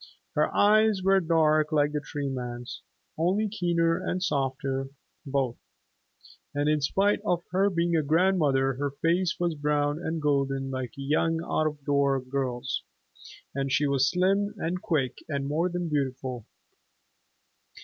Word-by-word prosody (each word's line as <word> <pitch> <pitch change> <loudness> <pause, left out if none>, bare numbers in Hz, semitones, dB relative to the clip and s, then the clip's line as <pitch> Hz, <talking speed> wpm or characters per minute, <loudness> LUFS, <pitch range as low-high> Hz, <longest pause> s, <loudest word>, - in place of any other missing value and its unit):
Her - - +1
eyes 215 -1 +4
were 195 0 +5
dark 155 -2 +2
like 150 -1 +2
the 150 - -1
Tree 145 -1 -5
Man's, 125 -2 -5 0.4
only 190 +6 +2
keener 170 -4 0
and 185 0 -2
softer, 135 -3 -1 0.4
both. 135 -3 -1 1.0
And 145 +1 0
in 150 0 +2
spite 195 +8 +2
of 175 -5 0
her 195 +2 +3
being 170 -2 0
a 160 - +3
grandmother 150 -4 +2
her 145 +1 -1
face 170 +5 0
was 175 -1 +1
brown 145 0 0
and 165 -1 -3
golden 135 -2 0
like 130 -2 -4
a - - -6
young 160 +3 +1
out 155 -2 0
of 150 -2 -6
door 140 -1 +2
girl's, 130 -1 -3 0.7
and 135 0 -2
she 145 +2 +2
was 135 -1 +2
slim 195 +3 +1
and 180 +2 -2
quick 135 -7 -1
and 140 -2 -2
more 160 +5 0
than 175 -1 -3
beautiful. 130 -5 -3
150 Hz, 150 wpm, -27 LUFS, 135-175 Hz, 1.0 s, were